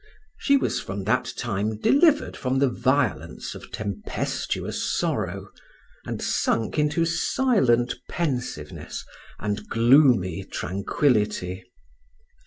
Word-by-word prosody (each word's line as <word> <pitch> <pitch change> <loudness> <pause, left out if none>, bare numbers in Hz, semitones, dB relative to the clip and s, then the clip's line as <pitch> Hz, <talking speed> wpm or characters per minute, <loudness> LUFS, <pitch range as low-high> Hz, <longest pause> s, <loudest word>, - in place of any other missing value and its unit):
She 280 -1 +4
was - - 0
from 95 0 -5
that 120 +6 +1
time 105 -1 -2
delivered 295 - +3
from 130 -1 -1
the 135 0 +3
violence 130 -1 -1
of - - -11
tempestuous 100 -3 -3
sorrow, - - -2 0.6
and - - -3
sunk 115 +6 0
into 150 +3 +2
silent 170 - +2 0.2
pensiveness 125 - -4 0.3
and 105 0 -3
gloomy 115 - +4
tranquillity. 100 - -1
120 Hz, 95 wpm, -25 LUFS, 105-150 Hz, 0.6 s, She